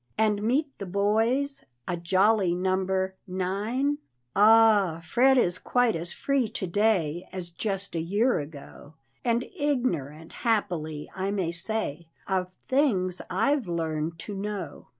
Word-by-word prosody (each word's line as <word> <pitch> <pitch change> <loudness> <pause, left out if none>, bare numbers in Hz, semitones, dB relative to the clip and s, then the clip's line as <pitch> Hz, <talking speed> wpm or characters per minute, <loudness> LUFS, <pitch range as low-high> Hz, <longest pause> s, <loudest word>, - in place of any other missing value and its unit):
and 210 -2 +2
meet 270 +6 0
the 200 - -4
boys, 225 +9 +1 0.2
A 175 - 0
jolly 185 +2 +2
number 190 +1 0
nine?" 210 +10 -1 0.4
Ah, 210 -5 +5
Fred 260 +9 +4
is 180 -7 +2
quite 245 -2 +2
as 170 +1 -4
free 275 -5 0
to 190 - -3
day 180 -4 +1
As 180 -2 -5
just 195 +2 -3
a 165 - -1
year 205 +8 +2
ago, 145 0 -10 0.3
And 235 0 +1
ignorant, 170 - -1
happily, 175 -10 -1
I 190 +1 -2
may 190 -5 -1
say, 170 -3 -3 0.2
Of 185 -2 0 0.2
things 195 -10 +1
I've 260 +6 +1
learned 165 -1 -2
to 210 - -5
know. 200 0 -5
195 Hz, 130 wpm, -27 LUFS, 175-225 Hz, 0.4 s, Ah